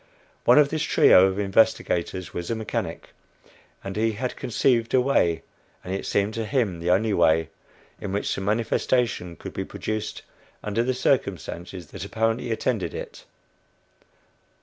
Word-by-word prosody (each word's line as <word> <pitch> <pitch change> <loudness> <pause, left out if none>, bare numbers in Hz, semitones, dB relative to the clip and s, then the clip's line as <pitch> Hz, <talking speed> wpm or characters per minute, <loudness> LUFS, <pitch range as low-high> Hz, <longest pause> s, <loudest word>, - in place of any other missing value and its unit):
One 120 - +6
of 150 -1 +6
this 155 0 -2
trio 95 - +6
of 95 0 -2
investigators 95 -3 +1
was 85 -1 -5
a 115 - 0
mechanic, 110 -1 -4 0.7
and 95 - -5
he 110 +1 +1
had 125 +4 -3
conceived 120 0 +1
a - - +6
way 85 -11 +2 0.4
and 90 - -4
it 95 - -4
seemed 100 +2 +1
to 115 0 -3
him 110 -11 0
the 85 +1 -2
only 100 +4 +3
way 80 -3 +3 0.5
in 100 - -5
which 100 +1 -1
the - - -4
"manifestation" 110 -2 0
could - - -9
be - - -3
produced 110 -1 -5 0.4
under 105 +2 0
the 130 +2 0
circumstances 95 - -1
that - - -7
apparently 115 +2 -1
attended 110 -2 -1
it. - - -8
110 Hz, 150 wpm, -25 LUFS, 95-115 Hz, 0.7 s, One